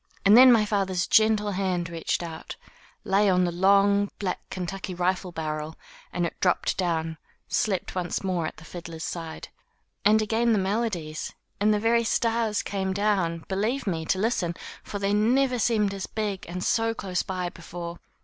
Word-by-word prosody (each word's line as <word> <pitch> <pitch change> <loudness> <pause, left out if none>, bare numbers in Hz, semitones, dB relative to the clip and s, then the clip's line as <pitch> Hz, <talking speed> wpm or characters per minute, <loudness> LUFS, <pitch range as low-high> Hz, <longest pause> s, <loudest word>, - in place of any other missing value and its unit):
And 200 +2 +8
then 255 +1 +9
my 225 -3 +5
father's 190 -3 0
gentle 215 -1 +3
hand 185 -3 -1
reached 165 +1 -2
out, 165 -2 -7 0.5
lay 200 +1 +3
on 180 -1 +3
that 175 -1 0
long, 200 +2 +4
black, 190 -3 -2
Kentucky 185 0 -5
rifle 180 +1 -1
barrel, 155 -1 -4 0.4
and - - -1
it - - -5
dropped - - +1
down, 165 -3 -1 0.3
slept 195 -4 -1
once 180 0 -2
more 180 -4 -1
at - - -8
the 160 - -13
fiddler's 165 -2 -8
side. 165 -2 -6 0.5
And 210 +2 +5
again 225 +2 +2
the - - +3
melodies; 190 -6 -2 0.2
and 210 +1 +3
the 210 - +2
very 230 +2 +3
stars 225 -1 +1
came 190 -1 -2
down, 190 -5 0
believe 220 +8 -1
me, 165 -5 -1
to 190 - +1
Hsten, 185 -5 0 0.3
for 205 - -6
they 200 0 0
never 250 +4 +2
seemed 210 -3 +2
as 195 -1 -5
big 210 -3 -3
and 180 +1 -4
so 225 0 +1
close 185 -5 -2
by 185 -2 -3
before. 170 0 -8
195 Hz, 170 wpm, -26 LUFS, 175-215 Hz, 0.5 s, then